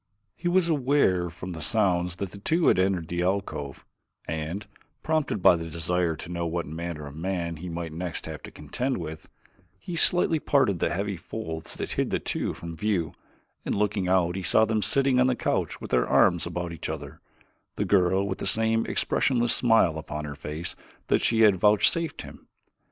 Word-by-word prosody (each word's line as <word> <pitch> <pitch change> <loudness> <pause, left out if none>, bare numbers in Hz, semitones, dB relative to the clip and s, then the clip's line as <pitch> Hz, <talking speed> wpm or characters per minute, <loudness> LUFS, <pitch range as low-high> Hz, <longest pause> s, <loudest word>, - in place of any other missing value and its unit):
He 175 - -4
was 175 0 +3
aware 135 - +2
from 85 +2 -8
the 80 -2 -6
sounds 90 -2 +1
that 95 0 -5
the 100 - -10
two 160 - +2
had - - +3
entered 95 -3 +1
the 85 +1 -2
alcove, 90 -7 -2 0.4
and, 80 +6 -4 0.4
prompted 155 - 0
by - - +8
a - - 0
desire 85 +1 0
to 80 +3 -9
know 85 -1 -2
what 85 +1 -2
manner 80 0 -5
of 70 0 -9
man 85 -1 -3
he 90 +3 -7
might 85 -1 -5
next 85 -1 -4
have - - -7
to - - -9
contend 130 +1 -3
with, 80 -2 -7 0.5
he 175 - -6
slightly 170 -1 +3
parted 130 - +2
the - - +1
heavy 100 +1 -2
folds 80 -2 -6
that - - -4
hid - - 0
the - - +1
two - - -3
from 85 - -7
his 80 - -10
view 95 -6 0 0.5
and - - -1
looking 105 -2 0
out 90 -1 +2
saw 110 +5 +4
them 110 -1 0
sitting 130 +5 +3
on 125 - +5
the 130 - +2
couch - - -1
with - - -8
their 60 -1 +3
arms 85 -1 +4
about 85 0 -4
each 85 - -5
other, - - -6 0.6
the - - -1
girl 95 0 +3
with 95 - -3
the - - -3
same 115 +2 +2
expressionless 120 -3 +1
smile 115 -10 +3
upon 75 -1 -5
her 75 - -5
face 75 +4 -6 0.3
that - - +3
she 115 -1 +2
had 105 -4 +6
vouchsafed 105 - +2
him. - - -13
90 Hz, 195 wpm, -26 LUFS, 85-110 Hz, 0.6 s, by